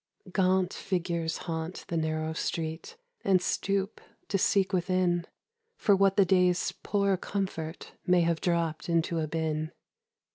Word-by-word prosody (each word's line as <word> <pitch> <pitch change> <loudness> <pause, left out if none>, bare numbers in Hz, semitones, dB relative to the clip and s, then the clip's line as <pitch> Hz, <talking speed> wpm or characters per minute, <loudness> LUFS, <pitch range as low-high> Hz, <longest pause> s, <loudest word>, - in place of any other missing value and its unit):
Gaunt 185 -1 +2
figures 170 -3 -2
haunt 165 0 -4
the 170 - -3
narrow 160 0 -1
street 160 - -4 0.3
And 190 -2 +4
stoop 195 +2 -1 0.3
to 195 - +1
seek 195 0 +2
within 180 -1 +1 0.5
For 200 - +4
what 195 0 +3
the 200 - +6
day's 180 -1 +3
poor 200 -2 +1
comfort 185 -4 -4 0.2
May 180 -1 +5
have 165 -1 +1
dropped 170 -2 0
into 170 0 +1
a 155 - -1
bin. 155 0 -2
175 Hz, 135 wpm, -29 LUFS, 160-190 Hz, 0.5 s, the